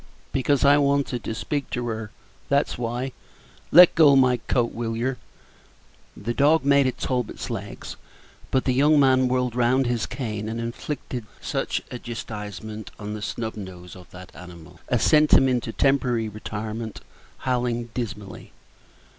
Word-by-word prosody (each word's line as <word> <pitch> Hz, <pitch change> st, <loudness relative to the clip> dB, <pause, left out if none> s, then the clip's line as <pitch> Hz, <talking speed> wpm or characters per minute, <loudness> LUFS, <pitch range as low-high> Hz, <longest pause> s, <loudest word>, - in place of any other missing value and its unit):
"Because 135 Hz, +1 st, +1 dB
I 145 Hz, +1 st, +6 dB
wanted 140 Hz, -3 st, +1 dB
to 110 Hz, -, -3 dB
speak 145 Hz, +5 st, -3 dB
to 120 Hz, -1 st, -3 dB
her, 110 Hz, -1 st, -4 dB, 0.4 s
that's 140 Hz, +1 st, +1 dB
why. 120 Hz, +2 st, -3 dB, 0.6 s
Let 180 Hz, +1 st, +9 dB
go 150 Hz, -4 st, +6 dB
my 130 Hz, -2 st, +4 dB
coat, 120 Hz, 0 st, -1 dB
will 115 Hz, -1 st, -3 dB
yer?" 125 Hz, +2 st, -1 dB, 1.0 s
The 120 Hz, -, -3 dB
dog 145 Hz, +3 st, +3 dB
made 140 Hz, -1 st, +4 dB
at 130 Hz, -, -2 dB
Talbot's 125 Hz, -4 st, -3 dB
legs, -, -, -6 dB, 0.5 s
but 130 Hz, -, +1 dB
the 130 Hz, -, +2 dB
young 145 Hz, +3 st, +4 dB
man 130 Hz, -2 st, +4 dB
whirled 125 Hz, -1 st, 0 dB
round 125 Hz, +2 st, +2 dB
his 120 Hz, -2 st, -1 dB
cane 110 Hz, -5 st, -4 dB
and 115 Hz, +1 st, -4 dB
inflicted 120 Hz, 0 st, -5 dB
such -, -, -2 dB
a 125 Hz, -, -5 dB
chastisement 110 Hz, -2 st, -7 dB
upon 105 Hz, 0 st, -6 dB
the 105 Hz, -, -6 dB
snub 110 Hz, +1 st, -4 dB
nose 90 Hz, -4 st, -9 dB
of 90 Hz, -1 st, -14 dB
that 90 Hz, 0 st, -12 dB
animal 85 Hz, -3 st, -12 dB
as -, -, +1 dB
sent 150 Hz, -1 st, +4 dB
him 135 Hz, -, +7 dB
into 125 Hz, -3 st, 0 dB
temporary 125 Hz, -4 st, +1 dB
retirement, 110 Hz, +1 st, -6 dB, 0.4 s
howling 120 Hz, -2 st, -1 dB
dismally. 105 Hz, -5 st, -6 dB
120 Hz, 155 wpm, -24 LUFS, 110-135 Hz, 1.0 s, Let